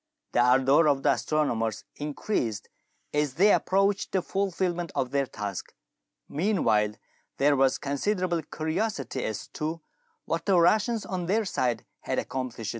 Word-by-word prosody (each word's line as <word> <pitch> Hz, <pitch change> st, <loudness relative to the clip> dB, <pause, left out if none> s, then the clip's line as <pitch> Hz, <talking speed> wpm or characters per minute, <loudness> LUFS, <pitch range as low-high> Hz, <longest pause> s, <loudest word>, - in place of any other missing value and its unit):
The -, -, +1 dB
ardour 135 Hz, +5 st, +5 dB
of 140 Hz, -2 st, +2 dB
the -, -, +5 dB
astronomers 115 Hz, -8 st, 0 dB
increased 145 Hz, -, -2 dB, 0.4 s
as 150 Hz, -3 st, 0 dB
they 200 Hz, +4 st, +5 dB
approached 195 Hz, +1 st, +1 dB
the 190 Hz, -2 st, +1 dB
fulfilment 180 Hz, -3 st, -1 dB
of 130 Hz, -, -1 dB
their 140 Hz, -1 st, +1 dB
task. 100 Hz, -5 st, -6 dB, 0.5 s
Meanwhile 140 Hz, -, +1 dB, 0.4 s
there 145 Hz, +1 st, +4 dB
was 135 Hz, -1 st, +3 dB
considerable 175 Hz, +4 st, -1 dB
curiosity 155 Hz, -, -3 dB
as 110 Hz, -, -3 dB
to 160 Hz, +2 st, -4 dB, 0.5 s
what -, -, -2 dB
the 190 Hz, -3 st, +5 dB
Russians 215 Hz, +6 st, +3 dB
on 180 Hz, -2 st, -3 dB
their 215 Hz, +4 st, +2 dB
side 125 Hz, -10 st, -1 dB
had -, -, -3 dB
accomplished. 125 Hz, -4 st, -3 dB
150 Hz, 135 wpm, -27 LUFS, 130-185 Hz, 0.5 s, ardour